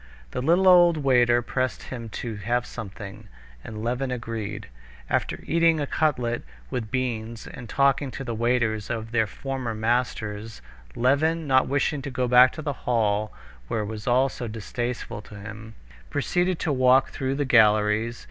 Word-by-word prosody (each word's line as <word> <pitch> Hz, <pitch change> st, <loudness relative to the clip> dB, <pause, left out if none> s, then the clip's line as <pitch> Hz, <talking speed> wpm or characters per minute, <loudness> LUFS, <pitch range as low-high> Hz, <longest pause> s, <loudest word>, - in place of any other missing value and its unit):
The -, -, -3 dB
little 175 Hz, +7 st, +3 dB
old 175 Hz, -2 st, +7 dB
waiter 120 Hz, -4 st, +3 dB
pressed 130 Hz, +2 st, -2 dB
him 115 Hz, -3 st, -7 dB, 0.2 s
to 115 Hz, -3 st, -4 dB
have 120 Hz, +5 st, -1 dB
something, 100 Hz, +1 st, -8 dB, 0.4 s
and 110 Hz, -1 st, -7 dB
Levin 125 Hz, +3 st, -1 dB
agreed. 110 Hz, -4 st, -5 dB, 0.4 s
After -, -, -1 dB
eating 165 Hz, -1 st, +3 dB
a 145 Hz, -, 0 dB
cutlet 125 Hz, -6 st, 0 dB, 0.3 s
with 110 Hz, -3 st, -3 dB
beans 115 Hz, -3 st, -3 dB
and 125 Hz, -4 st, -10 dB
talking 140 Hz, +1 st, +2 dB
to 135 Hz, -, -6 dB
the 120 Hz, -3 st, -4 dB
waiters 115 Hz, -2 st, 0 dB
of 115 Hz, -1 st, -4 dB
their 110 Hz, -2 st, +2 dB
former 130 Hz, +1 st, -4 dB
masters, 110 Hz, -2 st, -2 dB, 0.4 s
Levin, 155 Hz, +6 st, +2 dB
not 130 Hz, -2 st, +3 dB
wishing 140 Hz, +1 st, 0 dB
to 140 Hz, -, -5 dB
go 130 Hz, -1 st, -1 dB
back 125 Hz, +1 st, +7 dB
to 155 Hz, -, -7 dB
the 145 Hz, -, -2 dB, 0.2 s
hall, 105 Hz, -3 st, +1 dB, 0.4 s
where 110 Hz, -, -1 dB
it -, -, -3 dB
was 105 Hz, -1 st, -8 dB
all 125 Hz, +2 st, +4 dB
so 125 Hz, -2 st, -6 dB
distasteful 115 Hz, +1 st, -4 dB
to 105 Hz, -, -13 dB
him, 110 Hz, +2 st, -9 dB, 0.3 s
proceeded 180 Hz, -, 0 dB
to 155 Hz, -, 0 dB
walk 130 Hz, 0 st, +4 dB
through 135 Hz, 0 st, -2 dB
the 145 Hz, 0 st, -1 dB
galleries. 110 Hz, -1 st, +3 dB
120 Hz, 165 wpm, -25 LUFS, 110-135 Hz, 0.4 s, old